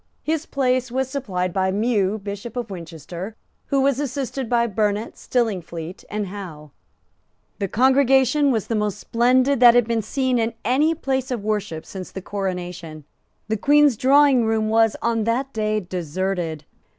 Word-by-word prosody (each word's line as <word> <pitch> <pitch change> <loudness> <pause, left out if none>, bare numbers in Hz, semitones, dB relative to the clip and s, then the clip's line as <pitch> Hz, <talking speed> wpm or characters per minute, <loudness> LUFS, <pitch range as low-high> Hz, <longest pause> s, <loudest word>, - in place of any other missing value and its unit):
His 320 0 -2
place 255 -2 0
was 265 +1 -1
supplied 185 -10 -2
by 190 -1 +1
Mew, 205 0 +1
Bishop 205 +3 -7
of 235 -4 -4
Winchester, 175 +3 -7 0.3
who 275 -1 +1
was 275 -1 +2
assisted 270 -2 -3
by 235 -1 +3
Burnet, 210 0 -1
Stillingfleet 180 -7 -3
and 210 0 -2
Hough. 175 -7 -9 0.9
The 200 - -1
congregation 265 +4 +3
was 220 -5 0
the - - -3
most 210 -2 -1
splendid 255 +4 +2
that 240 -1 +8
had 245 -2 +4
been 230 -1 0
seen 255 +3 0
in 225 0 -1
any 295 +7 +2
place 265 -4 -2
of 240 -5 -3
worship 205 -7 -2
since 185 -2 -8
the - - -7
coronation. 180 -5 -5 0.4
The 220 0 -1
Queen's 290 +3 +4
drawingroom 250 -4 +3
was, 225 0 +3
on 230 -1 +1
that 260 +4 -1
day, 215 -1 0
deserted. 175 -2 -3
225 Hz, 150 wpm, -22 LUFS, 190-255 Hz, 0.9 s, that